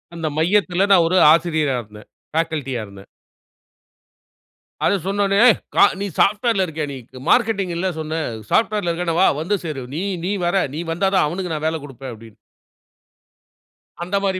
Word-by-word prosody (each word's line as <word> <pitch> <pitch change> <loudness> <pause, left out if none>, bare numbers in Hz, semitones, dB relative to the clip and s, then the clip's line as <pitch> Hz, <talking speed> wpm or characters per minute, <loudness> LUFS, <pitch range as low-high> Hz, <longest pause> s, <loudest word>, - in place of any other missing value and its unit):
அந்த 165 -2 -3
மையத்துல 185 +2 +2
நான் 175 -4 +6
ஒரு 185 +2 +1 0.2
ஆசிரியரா 160 -5 +1
இருந்தேன். 105 -1 -15 0.2
ஃபேகல்டியா 155 -7 -2
இருந்தேன். 100 0 -14 1.8
அதை - - +3
சொன்னவுடனே. 200 0 +1
"ஏய்! 235 - +5 0.2
க - - -6 0.2
நீ 200 - -2
சாஃப்ட்வேர்ல 210 -1 +2
இருக்கியா 160 -3 -4
நீ? 135 - -6 0.3
மார்க்கெட்டிங் 210 -7 +2
இல்ல 185 +2 0
சொன்ன, 155 +1 -3 0.3
சாஃப்ட்வேர்ல 210 -6 +1
இருக்கன்னா 170 -1 -2
வா. - - +6
வந்து 200 +5 0
சேரு. 145 -5 -4
நீ 165 - -2 0.2
நீ 195 - -1
வர. 180 +2 +1
நீ 160 - -3
வந்தா 185 +4 +1
தான், 185 - +4
அவனுக்கு 180 +2 -4
நான் 155 0 -3
வேலை 160 0 -2
குடுப்பேன்." 135 -2 -9
அப்படீன்னு. 115 -1 -14 1.7
அந்த 180 +3 -3
மாரி 190 -1 0
170 Hz, 155 wpm, -20 LUFS, 155-195 Hz, 1.8 s, நான்